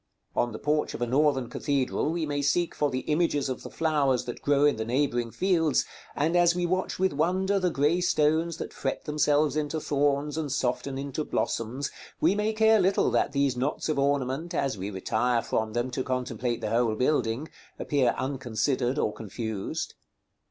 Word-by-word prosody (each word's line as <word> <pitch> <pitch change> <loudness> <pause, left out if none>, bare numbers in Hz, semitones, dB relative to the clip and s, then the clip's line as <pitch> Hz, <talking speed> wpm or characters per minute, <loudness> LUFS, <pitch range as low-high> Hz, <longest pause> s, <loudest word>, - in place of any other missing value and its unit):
On 120 - +1
the 110 - -6
porch 150 +3 0
of - - -7
a - - +2
Northern 135 0 +2
cathedral 140 +3 -1
we 165 -1 -1
may 145 -1 -2
seek 170 +5 +1
for 145 - 0
the 130 -1 -2
images 150 -2 0
of 130 - -4
the - - -8
flowers 145 -6 +1
that 120 - -6
grow 145 0 +3
in 145 -5 +3
the 110 - -2
neighboring 120 0 0
fields, 165 0 +1 0.3
and 160 +4 +1
as 175 -1 +4
we 180 0 0
watch 185 +2 -1
with 190 -2 +1
wonder 185 +6 +1
the 185 -1 +1
grey 160 +3 +1
stones 160 0 +2
that - - -6
fret - - -3
themselves 150 -1 +2
into 155 +1 -1
thorns, 145 +1 0
and 150 -3 -3
soften 135 0 -1
into 140 +2 -3
blossoms, 130 +1 -2 0.3
we - - +4
may 210 +1 0
care 220 0 +4
little 190 +1 +2
that - - +1
these 140 -2 +1
knots 135 +5 -2
of 150 - 0
ornament, 140 +4 0
as 135 -6 0
we 95 +1 -5
retire 110 +4 0
from 110 -1 -1
them 120 +2 -1
to 130 - -2
contemplate 125 -2 -2
the 105 - -2
whole 115 -1 +2
building, 125 +1 0 0.3
appear 135 -5 +1
unconsidered 130 0 -1
or 105 - 0
confused. 110 -1 -4
140 Hz, 185 wpm, -27 LUFS, 125-155 Hz, 0.3 s, as